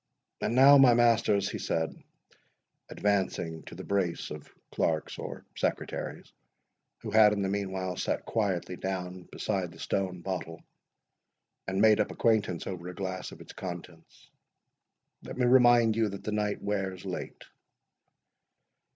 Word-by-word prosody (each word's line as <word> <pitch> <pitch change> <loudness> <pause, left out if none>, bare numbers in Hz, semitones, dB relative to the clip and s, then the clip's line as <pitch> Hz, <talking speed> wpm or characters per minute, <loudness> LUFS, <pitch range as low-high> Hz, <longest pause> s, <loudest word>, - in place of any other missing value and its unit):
—And 120 - 0
now, 140 +2 +8
my 125 -3 +7
masters," 115 -4 +3
he - - -4
said, 80 -1 -1 1.0
advancing 95 -5 -1
to - - -10
the - - -8
brace 95 -4 -1
of 75 -1 -9 0.2
clerks 80 -2 -1
or - - -7
secretaries, - - -3 0.7
who 110 - -6
had 105 -1 +6
in 100 -1 -1
the 95 - 0
meanwhile 95 -2 -2
sate - - -2
quietly 95 -5 -1
down 90 -1 -5
beside 95 -3 -2
the 85 - -14
stone 90 0 -2
bottle, 85 -3 -5 1.0
and 95 0 -1
made 110 -1 +6
up 105 - +1
acquaintance 105 -7 +1
over 90 -2 -6
a 90 - -8
glass 95 0 -4
of - - -12
its - - -11
contents—"Let 85 +4 -12
me 125 - +2
remind 120 -3 +6
you, 110 -2 +2
that 100 0 -8
the 110 - -3
night 105 -1 -1
wears 95 -2 -2
late." 95 -1 -6
95 Hz, 140 wpm, -29 LUFS, 90-110 Hz, 1.0 s, now